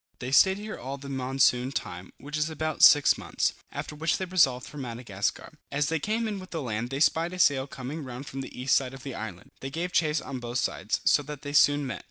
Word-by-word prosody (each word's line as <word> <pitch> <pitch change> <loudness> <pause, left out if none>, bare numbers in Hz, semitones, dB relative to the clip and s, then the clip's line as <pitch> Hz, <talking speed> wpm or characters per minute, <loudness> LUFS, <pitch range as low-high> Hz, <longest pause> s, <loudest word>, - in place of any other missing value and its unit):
They 125 +1 -5
stayed 190 +7 +6
here 215 +1 -7
all 135 +2 -5
the 140 0 -9
monsoon 130 -1 +2
time, 90 -8 -5
which 145 +2 -7
is 155 +1 0
about 155 0 -3
six 145 -1 +7
months; - - -1 0.2
after - - -5
which 160 +3 0
they 190 - -3
resolved 145 -9 +3
for 150 - -9
Madagascar. 115 -6 -4 0.2
As 145 0 0
they 160 -1 0
came 220 +7 -1
in 205 -2 -3
with 185 0 -10
the 165 - -4
land, 115 0 -3
they 135 +1 -3
spied 165 +3 +2
a - - -6
sail 140 -6 +3
coming 145 +2 -6
round 130 +1 -7
from 135 0 -6
the 130 - -9
east 130 +1 +3
side 135 -1 0
of 135 - -12
the 135 - -5
island. 105 -6 -7
They 135 - -5
gave 170 +5 -3
chase 155 -1 +2
on 130 - -6
both 120 0 -4
sides, - - -1
so - - +5
that 150 -2 -8
they 145 0 -5
soon 145 0 +5
met. 130 - -4
140 Hz, 245 wpm, -27 LUFS, 125-155 Hz, 0.2 s, six